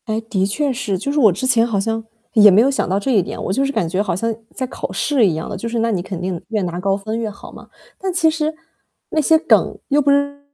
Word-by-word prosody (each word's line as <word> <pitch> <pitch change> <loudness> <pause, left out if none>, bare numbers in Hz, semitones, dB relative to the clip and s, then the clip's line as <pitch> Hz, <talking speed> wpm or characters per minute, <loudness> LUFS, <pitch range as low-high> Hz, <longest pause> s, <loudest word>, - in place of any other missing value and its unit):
哎， 220 0 -1
的 220 -4 -1
确 275 +7 -1
是， 210 -6 -2
就 280 +10 -3
是 295 - 0
我 220 -7 +6
之 195 +9 -3
前 240 -3 +4
好 220 -4 -1
像 225 +2 -2 0.3
也 210 -3 +8
没 200 +3 +6
有 270 +4 +3
想 270 - -1
到 190 +2 +1
这 265 +6 -1
一 215 -6 +4
点， - - -6
我 190 - -2
就 270 - +1
是 275 - 0
感 180 - -1
觉 185 +4 -1
好 205 - -1
像 230 +5 -1 0.2
在 260 - -2
考 255 - -6
试 275 -6 +2
一 165 - 0
样 160 - -4
的， - - -5
就 230 +5 -4
是 230 0 -2
那 230 0 +1
你 190 -4 -1
肯 185 -1 -6
定 180 -1 -3
越 215 -2 -1
拿 175 0 -3
高 195 +1 0
分 215 +3 -4
越 225 -2 -2
好 200 - -12
嘛， - - -13 0.3
但 380 0 -2
其 350 -2 +2
实 310 -1 -1 0.6
那 310 - +1
些 320 +3 +4
梗 320 - +2
又 290 +1 +3
不 285 - +1
是 285 0 +1
225 Hz, 310 characters per minute, -19 LUFS, 195-275 Hz, 0.6 s, 也